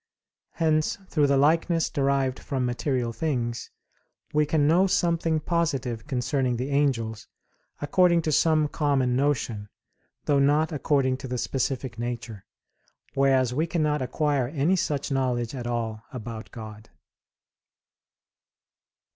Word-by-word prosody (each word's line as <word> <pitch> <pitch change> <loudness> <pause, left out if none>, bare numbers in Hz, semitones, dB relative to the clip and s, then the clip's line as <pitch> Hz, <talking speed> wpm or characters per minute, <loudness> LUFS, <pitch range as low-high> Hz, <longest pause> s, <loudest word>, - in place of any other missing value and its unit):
Hence 155 -2 +1
through 150 -3 +2
the 140 0 +3
likeness 165 +3 +2
derived 135 -2 0
from 130 -3 -2
material 125 -1 -1
things 120 -3 -2 0.6
we 150 0 +2
can 150 -1 +2
know 180 +5 +4
something 165 -3 +1
positive 140 -8 -1
concerning 130 -2 0
the 130 +4 -3
angels, 120 -6 0 0.6
according 170 +2 +3
to 155 - 0
some 155 0 +3
common 140 -5 +1
notion, 125 -7 -1 0.6
though 145 -2 +3
not 150 +4 +3
according 135 -3 +1
to 135 - -8
the 125 0 -3
specific 130 -1 -2
nature; 115 -4 -5 0.7
whereas 135 -2 +2
we 155 +6 0
cannot 150 -4 0
acquire 135 0 0
any 150 +6 +1
such 145 -6 -2
knowledge 125 -3 0
at 125 -3 -5
all 115 -2 -3
about 115 -3 -7
God. 110 -1 -10
135 Hz, 120 wpm, -26 LUFS, 120-150 Hz, 0.7 s, know